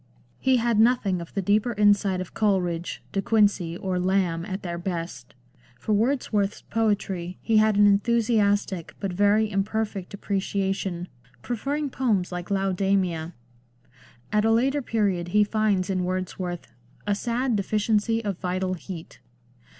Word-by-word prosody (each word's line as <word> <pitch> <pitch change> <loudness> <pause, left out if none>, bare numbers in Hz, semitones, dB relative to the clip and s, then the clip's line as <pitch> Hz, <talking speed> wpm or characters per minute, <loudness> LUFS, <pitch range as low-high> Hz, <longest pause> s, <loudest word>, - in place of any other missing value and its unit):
He 260 -1 +3
had 235 -2 +1
nothing 220 -6 +3
of 170 - -9
the 195 - 0
deeper 210 +5 +2
insight 205 -2 +3
of 185 - -8
Coleridge, 180 -5 0
De 195 - 0
Quincey, 200 -6 +2
or 185 -1 -2
Lamb 180 -2 +1
at 190 0 -5
their 170 -1 -4
best. 165 -9 -5 0.4
For 215 - -1
Wordsworth's 210 -3 0
poetry 195 -5 -1
he 225 -1 +2
had 215 -1 +4
an 205 - +6
enthusiastic 205 -3 +2
but 195 -3 -3
very 205 +3 +3
imperfect 200 -1 -2
appreciation, 195 -2 -2 0.4
preferring 275 +5 -2
poems 215 -10 0
like 180 -1 -5
Laodamia. 190 -4 0 1.0
At 210 0 +3
a 225 - +3
later 265 +6 +2
period 200 -8 0
he 210 +4 +4
finds 205 -3 +1
in 185 -2 -1
Wordsworth 180 -2 -4 0.2
" - - -31
a 205 - +1
sad 240 +3 -1
deficiency 215 +2 +1
of 195 -3 -2
vital 185 0 -1
heat." 175 -2 -8
200 Hz, 140 wpm, -25 LUFS, 185-220 Hz, 1.0 s, an